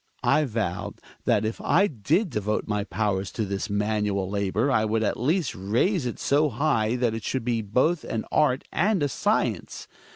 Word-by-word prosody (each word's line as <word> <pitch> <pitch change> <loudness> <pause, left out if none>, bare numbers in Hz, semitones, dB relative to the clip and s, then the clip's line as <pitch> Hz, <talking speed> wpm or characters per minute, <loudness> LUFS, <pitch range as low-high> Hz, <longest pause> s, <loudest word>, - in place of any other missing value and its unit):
Hjalmar. - - +3
I 155 - +3
vowed 105 -8 -3 0.2
that - - +2
if 110 - -3
I 195 +4 +3
did 160 - 0
devote 105 -1 -1
my 105 -1 -1
powers 100 -3 -1
to 110 - -1
this 100 +2 -3
manual 105 -1 0
labor 100 +6 0
I 110 -4 +3
would 110 +1 0
at - - 0
least 160 +8 +1
raise 125 - 0
it 120 - -4
so 145 +2 +2
high 120 -3 +1
that 120 -2 +1
it 115 -1 -5
should 130 0 -2
be 120 -2 0
both 130 - +1
an 110 - -3
art 140 -4 +2
ajid^A 190 -3 +2 0.4
acience. - - -6
115 Hz, 185 wpm, -25 LUFS, 105-145 Hz, 0.4 s, Hjalmar